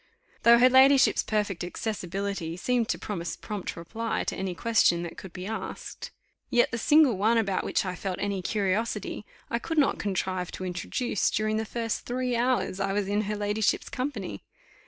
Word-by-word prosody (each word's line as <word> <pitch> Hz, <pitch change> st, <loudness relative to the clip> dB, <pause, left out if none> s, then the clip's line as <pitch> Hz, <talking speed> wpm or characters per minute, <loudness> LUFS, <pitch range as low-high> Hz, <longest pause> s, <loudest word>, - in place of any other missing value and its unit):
Though 235 Hz, 0 st, +7 dB
her 245 Hz, +2 st, +7 dB
ladyship's 265 Hz, +1 st, +6 dB
perfect 205 Hz, -5 st, -1 dB
accessibility 195 Hz, -2 st, -3 dB
seemed 240 Hz, +3 st, 0 dB
to -, -, 0 dB
promise 170 Hz, -5 st, -4 dB
prompt 205 Hz, -3 st, -5 dB
reply 220 Hz, +7 st, -3 dB
to -, -, -3 dB
any 185 Hz, -1 st, -3 dB
question 175 Hz, -4 st, +3 dB
that 170 Hz, -, -6 dB
could 190 Hz, -, -10 dB
be 185 Hz, +1 st, -7 dB
asked; 220 Hz, +2 st, -6 dB, 0.4 s
yet 240 Hz, 0 st, +3 dB
the 230 Hz, -, -2 dB
single 290 Hz, -7 st, +5 dB
one 225 Hz, +3 st, +3 dB
about 200 Hz, -4 st, +1 dB
which -, -, 0 dB
I 185 Hz, -, -2 dB
felt 185 Hz, +1 st, -4 dB
any 200 Hz, -2 st, -2 dB
curiosity, 210 Hz, +2 st, -1 dB, 0.2 s
I 235 Hz, -, +1 dB
could 325 Hz, +6 st, -4 dB
not 285 Hz, -2 st, +3 dB
contrive 185 Hz, -2 st, -2 dB
to 185 Hz, -, -5 dB
introduce 185 Hz, +5 st, -1 dB
during 215 Hz, 0 st, 0 dB
the 220 Hz, -, -1 dB
first 230 Hz, 0 st, -3 dB
three 250 Hz, 0 st, -1 dB
hours 240 Hz, -5 st, 0 dB
I 195 Hz, 0 st, 0 dB
was 205 Hz, -1 st, 0 dB
in 205 Hz, +1 st, +1 dB
her 210 Hz, -, -1 dB
ladyship's 210 Hz, 0 st, 0 dB
company. 225 Hz, -, -4 dB
210 Hz, 180 wpm, -27 LUFS, 185-235 Hz, 0.4 s, Though